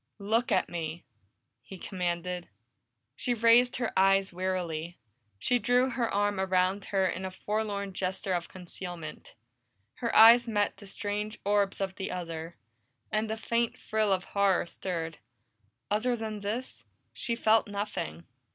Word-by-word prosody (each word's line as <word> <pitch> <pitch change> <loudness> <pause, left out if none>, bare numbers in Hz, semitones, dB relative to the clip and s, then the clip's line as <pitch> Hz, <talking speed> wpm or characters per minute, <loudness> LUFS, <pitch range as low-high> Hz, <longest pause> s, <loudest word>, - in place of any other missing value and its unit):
"Look 225 +5 0
at - - +3
me!" 165 -1 -5 0.6
he 190 - -10
commanded. 180 -1 -3 0.7
She 245 +8 -1
raised 235 +2 +5
her 245 -2 -2
eyes 195 0 +4
wearily; 175 -2 -3 0.4
she 245 - +1
drew 245 +4 +3
her 240 -2 -1
arm 205 -1 +1
about 190 +1 +1
her 195 -1 +1
in 185 0 -2
a 190 - -2
forlorn 200 0 -3
gesture 190 +1 -2
of 175 -1 -2
concealment. 175 -3 -8 0.6
Her 235 - -2
eyes 235 +2 +9
met 205 -3 0
the 200 0 -12
strange 210 +2 -3
orbs 200 -1 +2
of 190 -1 -3
the 190 - -3
other, 165 -2 -5 0.5
and 215 0 0
a 220 - -2
faint 230 +1 0
thrill 215 -2 0
of 185 -1 +1
horror 200 -3 +2
stirred; 165 -3 -4 0.7
other 240 +4 +2
than 220 -2 -4
this, 215 +6 -4 0.3
she 235 - -2
felt 225 -1 +3
nothing. 200 - -4
200 Hz, 140 wpm, -29 LUFS, 180-220 Hz, 0.7 s, eyes